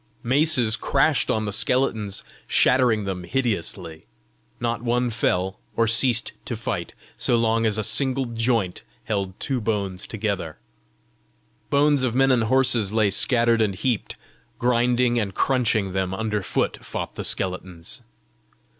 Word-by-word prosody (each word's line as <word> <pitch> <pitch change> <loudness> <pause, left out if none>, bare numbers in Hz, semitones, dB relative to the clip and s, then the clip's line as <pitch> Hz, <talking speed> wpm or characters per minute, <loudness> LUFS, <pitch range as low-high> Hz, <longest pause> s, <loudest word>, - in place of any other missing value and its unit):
Maces 130 -4 +3
crashed 140 +6 +2
on 110 -1 0
the 105 - -3
skeletons, 110 -4 0 0.2
shattering 125 -4 +3
them 95 -2 -4
hideously: 85 -7 -3 0.5
not 115 -1 -2
one 120 0 0
fell 95 -4 -1 0.2
or 115 - +3
ceased 115 +1 +2
to - - -3
fight, - - -4 0.2
so 120 - +1
long 115 0 +2
as 110 0 0
a 110 - -1
single 135 +3 +2
joint 115 -5 -1 0.2
held 100 -3 -3
two 130 -3 -1
bones 100 -4 -2
together. 100 -7 -3 1.1
Bones 145 0 +3
of 125 -2 0
men 135 0 +4
and 120 -3 +2
horses 120 -4 +2
lay 110 -2 +2
scattered 115 +2 +3
and 100 -3 +1
heaped; 120 +2 -2 0.4
grinding 120 0 +2
and 100 -4 -3
crunching 115 -7 +1
them 95 0 -1
under 105 -1 -2
foot - - -2
fought - - -5
the - - -5
skeletons. 90 -2 -3
115 Hz, 135 wpm, -23 LUFS, 100-125 Hz, 1.1 s, men